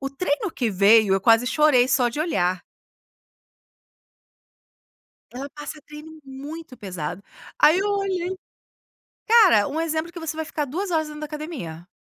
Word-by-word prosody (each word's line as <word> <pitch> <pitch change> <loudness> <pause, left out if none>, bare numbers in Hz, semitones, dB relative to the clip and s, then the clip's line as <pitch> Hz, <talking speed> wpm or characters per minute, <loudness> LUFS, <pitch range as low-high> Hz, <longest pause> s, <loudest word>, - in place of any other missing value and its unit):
O 275 - -3
treino 295 +6 -2
que 245 -8 -2
veio 200 +1 +5
eu 195 - +1
quase 225 +4 +4
chorei 260 -2 +3
só 250 -1 +3
de 240 +6 -5
olhar. 185 - 0 2.7
Ela 265 +3 -6
passa 295 +1 -8
treino 305 +1 -11
muito 280 +2 -9
pesado, 185 -3 -6 0.4
aí 310 +4 +5
eu 400 +2 0
olhei 385 -3 -1 1.0
cara, 420 - +6
um 295 +3 -3
exemplo 325 0 -2
que 345 - -9
você 325 -1 -4
vai 320 0 -4
ficar 300 -1 -3
2 360 +8 -4
horas 315 -2 0
dentro 300 0 -9
da - - -3
academia. 290 - -7
300 Hz, 150 wpm, -23 LUFS, 240-325 Hz, 2.7 s, cara